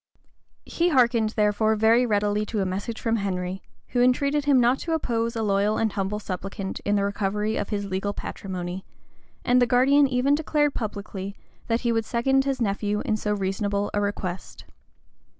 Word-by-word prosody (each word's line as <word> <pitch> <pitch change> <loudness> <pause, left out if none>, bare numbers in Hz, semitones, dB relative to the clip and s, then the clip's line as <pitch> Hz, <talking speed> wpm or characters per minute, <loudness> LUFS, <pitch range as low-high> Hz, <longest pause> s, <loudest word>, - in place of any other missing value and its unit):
He 345 +1 0
hearkened 240 -6 +3
therefore 215 +1 +2
very 225 +3 +4
readily 205 -1 +1
to 215 - -2
a 195 - +1
message 200 +5 -4
from 230 -1 0
Henry, 185 -2 -3 0.3
who 245 - +1
entreated 280 +4 +2
him 280 -3 +5
not 245 +2 +3
to 330 - -3
oppose 230 -6 -1
a 225 - -1
loyal 205 +1 +1
and 220 -1 +1
humble 195 +1 -2
supplicant 195 -1 -5
in 205 - 0
the 200 - +1
recovery 205 +1 -1
of - - -3
his 205 -2 -2
legal 195 +1 -2
patrimony; 185 -2 -6 0.6
and 250 +1 +4
the 245 - +4
guardian 275 +4 +4
even 260 +2 +2
declared 295 -1 +1
publicly 200 -3 -5 0.3
that 230 0 0
he 235 - +1
would 225 -1 0
second 270 +4 +1
his 270 -2 -1
nephew 210 -1 -1
in 215 - +1
so 210 -1 -1
reasonable 200 +1 -1
a 205 - +1
request. 190 -3 -4
215 Hz, 175 wpm, -25 LUFS, 200-245 Hz, 0.6 s, him